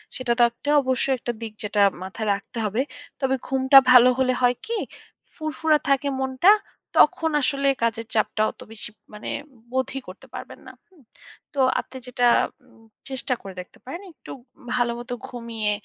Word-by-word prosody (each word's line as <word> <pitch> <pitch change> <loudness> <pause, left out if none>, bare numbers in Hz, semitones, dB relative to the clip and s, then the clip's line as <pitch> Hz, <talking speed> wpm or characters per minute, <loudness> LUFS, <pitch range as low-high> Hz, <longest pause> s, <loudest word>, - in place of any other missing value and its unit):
সেটাতে 240 +1 +1
অবশ্যই 260 +1 +1
একটা 240 - -3
দিক 225 -2 -6
যেটা 210 0 0 0.2
মাথায় 215 +3 -5
রাখতে 200 +4 -7
হবে। 215 +5 0 0.4
তবে 265 -1 +1
ঘুমটা 265 +1 +5
ভালো 250 0 +9
হলে 255 -1 +3
হয় 245 0 +4
কি? 465 0 -2 0.6
ফুরফুরা 310 0 +1
থাকে 275 +1 +2
মনটা। 265 +9 +4 0.5
তখন 320 -1 +4
আসলে 275 0 +1 0.2
কাজের 230 -1 -1
চাপটা 215 0 +1
অত - - -32
বেশি 215 -2 -5 0.2
মানে 210 - -7 0.4
বোধই 260 +1 -1
করতে 185 +1 -12
পারবেন - - -8
না। - - -8 0.2
হুম? 365 -6 -23 0.5
তো 280 - -4 0.2
আপনি 260 - -8
যেটা 250 0 0 0.4
উম 225 - -22 0.3
চেষ্টা 260 -1 -1
করে 195 -1 -9
দেখতে 180 - -17
পারেন, 305 +8 -6
একটু - - -13 0.4
ভালো 245 -1 +2
মতো 245 +1 -6
ঘুমিয়ে 230 -3 -3
250 Hz, 155 wpm, -24 LUFS, 230-270 Hz, 0.6 s, ভালো